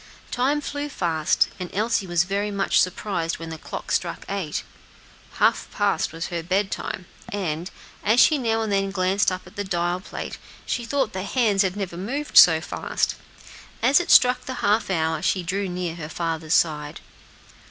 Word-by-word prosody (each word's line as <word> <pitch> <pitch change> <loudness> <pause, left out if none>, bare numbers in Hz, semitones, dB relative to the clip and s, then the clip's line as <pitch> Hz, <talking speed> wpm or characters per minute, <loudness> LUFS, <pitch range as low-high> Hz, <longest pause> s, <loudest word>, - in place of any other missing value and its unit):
Time 275 +4 +1
flew 290 0 -4
fast, 165 - +1
and 180 -1 -5
Elsie 215 -1 0
was 175 -1 +2
very 200 +3 -1
much 200 -1 +2
surprised 180 -2 -1
when 165 0 -7
the 160 -1 -7
clock - - -7
struck - - -1
eight. 190 -7 -3 0.7
Half - - +2
past - - 0
was 165 +1 -5
her 170 -2 -3
bedtime; 190 +1 -2 0.3
and, 175 -3 -3 0.3
as 220 +4 +3
she 305 +1 +6
now 225 -2 0
and 215 - -3
then 195 0 +1
glanced 190 +1 +1
up 185 0 -5
at 220 - -16
the 205 - -1
dial 175 -2 -1
plate, 185 - -7 0.3
she 240 - -2
thought 265 -3 0
the 185 - -3
hands 205 -1 +2
had 190 -2 0
never 185 -4 -4
moved 270 +11 -4
so 160 -2 +9
fast. 160 - -2 0.7
As 270 +6 +6
it 350 - -4
struck 250 0 +6
the 260 - -4
half 210 +1 +2
hour 160 -3 0
she 185 0 +1
drew 190 +3 -2
near 180 -2 -3
her 155 -2 -6
father's 165 -1 -1
side. 150 -2 0
190 Hz, 175 wpm, -24 LUFS, 170-215 Hz, 0.7 s, so